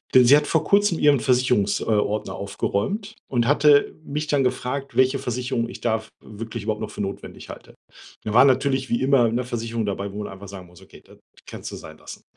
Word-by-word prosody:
Denn 125 - +8
sie 135 +4 +8
hat 150 0 +2
vor 160 +1 +1
Kurzem 200 -1 +3
ihren 145 -3 +4
Versicherungs 125 -5 +2
äh, - - -4
Ordner 105 -1 -1
aufgeräumt 195 - -3
und 120 -3 +1
hatte 145 +1 +4
mich 150 +1 -4
dann 145 -3 +1
gefragt, 130 +1 -3
welche 130 +1 +3
Versicherung 125 -1 -2
ich - - -9
da 110 -2 0
w 110 - -16 0.2
wirklich 115 +1 -7
überhaupt 105 0 -3
noch 110 - -4
für 105 - -7
notwendig 100 0 -7
halte. - - -11 0.5
Da 105 - -4
war 125 +4 +7
natürlich 130 0 +1
wie 120 - 0
immer 130 -4 +4
'ne 125 +2 -1
Versicherung 115 -2 -3
dabei, 100 0 -3
wo 105 +1 -5
man - - -7
einfach 100 +1 -11
sagen 95 -2 -9
muss: 90 0 -18
„Okay, - - -16
das - - -18 0.3
kannst - - -8
du - - -7
sein - - -11
lassen.“ - - -11
125 Hz, 220 wpm, -23 LUFS, 105-140 Hz, 0.5 s, Denn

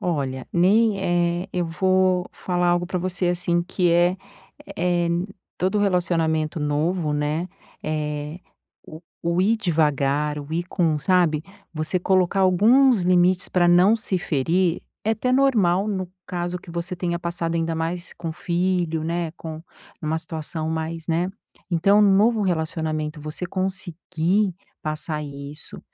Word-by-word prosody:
Olha, 135 -7 -2
nem, 200 +4 +4 0.4
eh, - - -10
eu 180 -1 0
vou 185 +2 +2
falar 180 -1 -1
algo 175 0 +2
pra 180 0 -2
você, 180 0 -1
assim, 175 -1 +1
que 180 -1 0
é 175 +2 +3 0.6
é, 175 -1 +1 0.5
todo 190 +4 +1
relacionamento 165 -5 +1
novo, 150 +2 0
né, 150 +4 -1 0.3
eh, 150 +1 -3 0.5
o 155 - -10 0.2
o 170 +1 +1
ir 220 +4 +3
devagar, 150 - +1
o 145 +2 -9
ir 170 +1 -1
com 160 -5 +1
sabe? 165 -2 +2 0.3
Você 155 +3 -1
colocar 185 +1 +2
alguns 220 +5 +5
limites 180 +1 +3
pra 175 -1 +3
não 180 +5 +6
se 205 -4 -2
ferir 170 +2 0 0.2
é 220 - +2
até 225 +3 0
normal 215 -9 +3
no 190 -3 -2 0.2
caso 175 0 -3
que 175 - -13
você 170 +1 -4
tenha 170 -1 -2
passado 170 -1 -2
ainda 165 0 -1
mais 170 +2 -3
com 165 -2 -5
filho, 170 -2 -1
né, 170 0 -2
com 160 -2 -8 0.4
uma 155 +1 0
situação 160 -1 -4
mais, 160 0 -3
né 170 +2 +1 0.4
Então 195 +5 +4
um - - +6
novo 220 +1 +3
relacionamento 160 -3 -2
você 155 +4 -5
conseguir 185 0 -1 0.3
passar 155 0 -3
isso, 140 +1 -7
175 Hz, 140 wpm, -23 LUFS, 160-185 Hz, 0.6 s, não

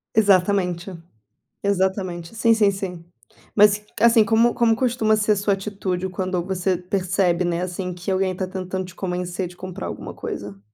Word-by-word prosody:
Exatamente 190 -3 +2 0.7
exatamente 190 -1 -1
sim, 230 0 +4
sim, 210 -3 +4
sim. 185 -3 -5 0.5
Mas 210 0 +5 0.2
assim, 230 -1 +6
como 230 +3 +3
como 230 -1 +3
costuma 230 -3 +2
ser 215 0 +2
a - - 0
sua 200 0 +1
atitude 195 -2 -3
quando 185 -1 -2
você 185 -1 0
percebe, 180 -1 0
né. 175 0 -1
Assim, 180 0 -4
que 180 +2 -4
alguém 185 -1 0
tá 185 0 -3
tentando 185 0 -4
te 180 - -13
convencer 180 0 -3
de 175 0 -14
comprar 185 0 -6
alguma - - -7
coisa? 100 -1 -6
190 Hz, 160 wpm, -22 LUFS, 180-205 Hz, 0.7 s, assim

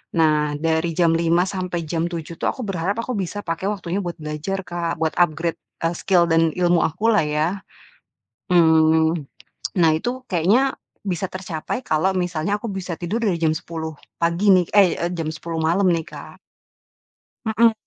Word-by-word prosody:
nah, 150 -2 +2
dari 160 +2 0
jam 170 -2 +3
5.00 170 +1 +3
sampai 180 -3 -3
jam 165 +2 -1
7.00 170 -1 -6
tuh - - 0
aku 255 - -7
berharap 195 -1 -1
aku 255 - -4
bisa 200 +2 -4
pakai 165 +3 -3
waktunya 195 -2 -2
buat 175 -3 -4
belajar 155 +6 -3
Kak, 175 -1 -3
buat 160 -1 +1
upgrade, 165 0 +1 0.2
eee, 165 - +2
skill 180 -3 +3
dan 165 -1 +4
ilmu 175 -1 +3
aku 210 +8 +1
lah 210 -7 +3
ya. 150 +1 +1 1.1
Mmm, 160 -1 +4 0.5
nah 165 -2 +5
itu 160 +10 -1 0.2
kayaknya 205 +11 +3 0.3
bisa 185 0 -1
tercapai 185 +5 -4
kalau 155 +5 +2
misalnya 180 +2 -1
aku 230 - -5
bisa 190 -3 -4
tidur 205 +7 -2
dari 185 -5 +1
jam 160 -1 +2
10.00 160 -1 -5 0.3
pagi 170 +5 +2
nih 180 -2 +3
ey, 195 -2 +7
eee, 170 - -1
jam 165 -2 -3
10 165 +1 -5
malam 180 +5 +2
nih, 165 - -1
Kak. - - -11 1.1
Mhm. 225 +1 +4
170 Hz, 170 wpm, -22 LUFS, 160-190 Hz, 1.1 s, ey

